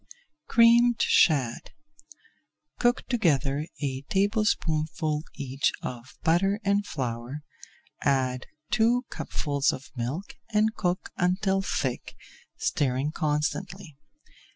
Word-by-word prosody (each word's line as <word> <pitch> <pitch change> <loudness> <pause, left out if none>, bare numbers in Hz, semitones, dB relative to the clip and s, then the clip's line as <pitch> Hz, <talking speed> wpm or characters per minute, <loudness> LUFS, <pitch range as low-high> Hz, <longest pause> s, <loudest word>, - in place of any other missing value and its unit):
CREAMED 235 0 +5
SHAD 135 -8 +3 1.1
Cook 240 +1 +2
together 150 - +1 0.2
a 135 -2 -2
tablespoonful 165 -7 0
each 135 0 0
of 125 0 -7
butter 185 +5 +3
[Page 215 - -12
337] 200 - +2
and 205 0 +1
flour, 125 +1 -4 0.6
add 130 -2 0 0.2
two 240 +2 +3
cupfuls 145 -2 0
of 130 - -8
milk 130 +11 -4
and 215 0 +2
cook 180 -4 -2
until 190 +2 +1
thick, 130 -9 -3 0.4
stirring 135 +1 0
constantly. 160 +3 -2
160 Hz, 100 wpm, -27 LUFS, 135-200 Hz, 1.1 s, CREAMED